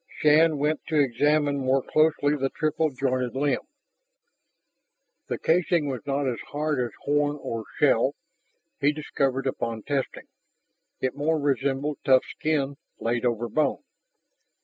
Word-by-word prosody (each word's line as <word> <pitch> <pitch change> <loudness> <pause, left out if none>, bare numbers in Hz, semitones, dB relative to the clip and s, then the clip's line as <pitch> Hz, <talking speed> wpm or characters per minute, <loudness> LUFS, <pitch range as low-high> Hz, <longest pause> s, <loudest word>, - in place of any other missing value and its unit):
Shann 155 +1 +4
went 150 +2 0
to 155 -2 +1
examine 145 +2 +2
more 130 0 +1
closely 150 -1 +2
the 135 -2 -1
triple 155 +2 0
jointed 130 -2 -1
limb. 140 -1 +1 1.7
The - - -2
casing 170 -1 +2
was 130 -4 -4
not 140 0 0
as 120 -3 -2
hard 150 -1 -1
as 120 - -3
horn 145 0 +1
or 115 -4 -5
shell, - - +3 0.6
he 145 +2 +3
discovered 135 -3 -1
upon 115 -4 -3
testing; 140 -2 -3 0.8
it 130 - -1
more 155 +2 0
resembled 140 +1 -1
tough 130 -1 +4
skin 140 -3 -2 0.2
laid 120 +1 -1
over 120 0 -1
bone. 155 +5 0
140 Hz, 130 wpm, -26 LUFS, 130-150 Hz, 1.7 s, Shann